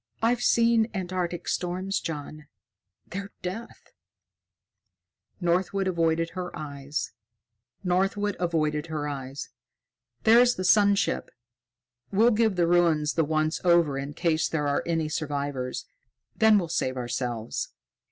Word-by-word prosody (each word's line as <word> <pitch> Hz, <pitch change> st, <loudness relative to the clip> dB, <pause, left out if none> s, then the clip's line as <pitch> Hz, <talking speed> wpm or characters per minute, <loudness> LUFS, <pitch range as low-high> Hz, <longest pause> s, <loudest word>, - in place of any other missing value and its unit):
"I've 235 Hz, +2 st, +1 dB
seen 230 Hz, -1 st, +3 dB
Antarctic 180 Hz, -2 st, -3 dB
storms, 185 Hz, +2 st, -1 dB
John. 155 Hz, -1 st, -6 dB, 0.6 s
They're 200 Hz, +2 st, -5 dB
death." 190 Hz, +6 st, -7 dB, 1.5 s
Northwood 190 Hz, +2 st, +1 dB
avoided 165 Hz, -2 st, +1 dB
her 180 Hz, -1 st, -4 dB
eyes. 145 Hz, -1 st, -4 dB, 0.7 s
"There's 185 Hz, +1 st, +1 dB, 2.4 s
the 185 Hz, -, -3 dB
sun 205 Hz, +2 st, +5 dB
ship. -, -, -1 dB, 0.8 s
We'll 220 Hz, +5 st, +5 dB
give 220 Hz, -2 st, +2 dB
the 175 Hz, -1 st, +3 dB
ruins 165 Hz, -3 st, +3 dB
the 165 Hz, -, +2 dB
once 155 Hz, +1 st, 0 dB
over 170 Hz, -5 st, +4 dB
in 140 Hz, +1 st, -5 dB
case 165 Hz, -2 st, +1 dB
there 150 Hz, -3 st, -1 dB
are 145 Hz, -, +1 dB
any 165 Hz, -2 st, 0 dB
survivors; 145 Hz, -4 st, -3 dB, 0.5 s
then 220 Hz, -2 st, +5 dB
we'll 180 Hz, -4 st, 0 dB
save 130 Hz, -4 st, -1 dB
ourselves." 120 Hz, -2 st, -3 dB
170 Hz, 105 wpm, -27 LUFS, 150-190 Hz, 2.4 s, sun